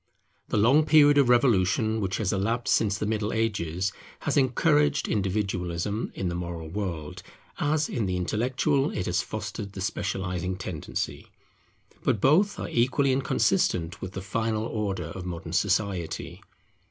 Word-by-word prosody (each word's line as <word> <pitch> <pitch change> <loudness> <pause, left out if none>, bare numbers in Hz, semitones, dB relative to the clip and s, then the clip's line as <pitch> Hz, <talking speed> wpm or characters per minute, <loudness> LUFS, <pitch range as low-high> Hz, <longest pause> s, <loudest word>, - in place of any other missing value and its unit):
The - - -1
long 130 +9 +5
period 145 -2 +6
of 135 -3 +4
revolution 110 -2 +3
which 95 -1 -1
has 105 -4 0
elapsed 115 +5 0
since 105 -3 +2
the 105 - -2
Middle 105 0 -1
Ages 95 -5 -1 0.3
has - - -1
encouraged 145 +3 +3
individualism 95 0 -1
in 95 - -2
the 85 - -2
moral 85 -2 -5
world, 85 -5 -4 0.4
as 155 +1 +1
in 110 -5 -2
the 90 -1 -1
intellectual 125 - +1
it 90 - -3
has 90 0 +1
fostered 105 -1 -6
the 95 - -6
specializing 95 -2 -2
tendency. 90 -4 -4 0.8
But 105 - +1
both 170 - +3
are - - -3
equally 135 +3 +2
inconsistent 90 -8 +1
with 95 +1 -6
the 95 - -5
final 110 +1 -1
order 100 -6 -2
of 90 +2 -7
modern 85 -1 -6
society. 95 -2 -1
105 Hz, 145 wpm, -27 LUFS, 90-120 Hz, 0.8 s, period